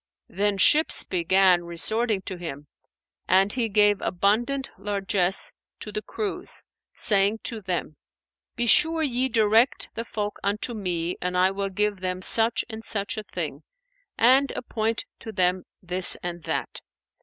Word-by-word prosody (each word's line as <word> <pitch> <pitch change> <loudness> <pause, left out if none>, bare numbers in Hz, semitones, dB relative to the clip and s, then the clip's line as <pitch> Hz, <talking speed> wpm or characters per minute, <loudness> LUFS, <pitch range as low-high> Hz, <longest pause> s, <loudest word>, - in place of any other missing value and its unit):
Then 205 0 0
ships 305 +11 +4
began 180 0 +2
resorting 205 +5 -1
to 190 - -6
him, 150 -4 -7 0.6
and 195 +2 +3
he 240 -3 -1
gave 205 -1 +3
abundant 235 +9 0
largesse 195 -2 0 0.3
to - - -7
the 425 - -4
crews, 425 -2 -4 0.3
saying 205 +1 +3
to 225 -2 -4
them, 175 -5 -4 0.6
"Be 240 - -1
sure 320 +7 +4
ye 260 -2 0
direct 225 +1 +2
the 230 - -4
folk 210 -2 -5
unto 210 +4 -2
me 180 -5 -3
and 180 0 -2
I 185 +1 +3
will 195 0 -3
give 205 0 -1
them 185 0 -4
such 225 +2 +3
and 220 -1 -8
such 215 +1 -1
a 215 - -4
thing - - -6 0.6
and 260 +4 +4
appoint 225 -2 -2
to 220 - -8
them 185 -2 0 0.2
this 180 +1 +4
and 175 -1 -5
that." - - -4
205 Hz, 145 wpm, -25 LUFS, 185-230 Hz, 0.6 s, ships